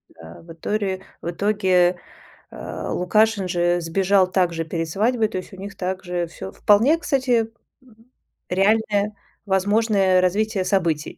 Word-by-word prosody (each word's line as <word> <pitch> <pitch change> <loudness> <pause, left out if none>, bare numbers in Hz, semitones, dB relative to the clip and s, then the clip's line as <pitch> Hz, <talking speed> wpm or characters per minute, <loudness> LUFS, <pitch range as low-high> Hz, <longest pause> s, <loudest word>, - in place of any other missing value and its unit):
Да, 80 +1 -13
в 165 - -13
иторе 190 +2 -3 0.2
в - - -4
итоге, 185 -1 +2 0.5
э, - - -7
Лукашин 210 +2 +1
же 175 0 +1
сбежал 185 +3 +2
так 180 -3 +1
же 165 0 -3
перед 165 0 -3
свадьбой, 220 +5 +1
то 190 - -5
есть 185 - -8
у - - -10
них 200 +1 -9
так 185 0 -3
же 175 -1 -2
всё 95 - -9
вполне 230 - +3
кстати 255 -7 0 1.0
реальное 205 +2 +1 0.3
возможное 195 -1 +2
развитие 195 +1 0
событий. 170 -5 -1
190 Hz, 140 wpm, -22 LUFS, 175-210 Hz, 1.0 s, вполне